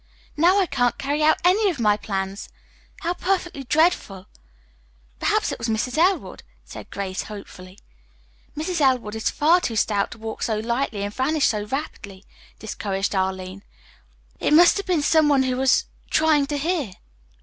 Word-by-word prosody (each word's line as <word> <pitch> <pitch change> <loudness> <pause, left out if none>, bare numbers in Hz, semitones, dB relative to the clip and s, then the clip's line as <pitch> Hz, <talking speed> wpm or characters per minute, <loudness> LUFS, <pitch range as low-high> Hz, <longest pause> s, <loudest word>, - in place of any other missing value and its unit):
"Now 350 +6 +4
I 385 - +3
can't 245 -7 0
carry 285 +2 -2
out 310 +1 +4
any 400 +3 +4
of 325 -8 -4
my 210 -3 +3
plans. 195 -1 -4 0.5
How 345 +2 -1
perfectly 355 -6 -2
dreadful!" 250 - +1 0.9
"Perhaps - - +1
it - - -6
was 230 0 -3
Mrs. 225 +3 -1
Elwood," 360 +4 +1 0.2
said - - -10
Grace 195 -1 -4
hopefully. 195 -2 -11 0.8
"Mrs. 325 +2 -2
Elwood 255 -6 +2
is 220 0 -1
far 335 +5 +3
too 230 - -3
stout 205 -1 +1
to - - -10
walk 220 0 -7
so 220 -2 0
lightly 235 -1 -2
and 205 0 -4
vanish 290 +4 +1
so 210 -2 0
rapidly," 210 -6 -6 0.3
discouraged 200 -2 -3
Arline. 190 0 -3 0.8
"I - - -4
it - - +3
must 345 +4 +6
have 400 - -5
been 345 -5 +1
some 310 0 +4
one 275 -2 +4
who 255 -1 -1
was 265 0 +3 0.2
trying 310 -3 +3
to 290 - -2
hear." 295 - -2
260 Hz, 165 wpm, -23 LUFS, 205-315 Hz, 0.9 s, must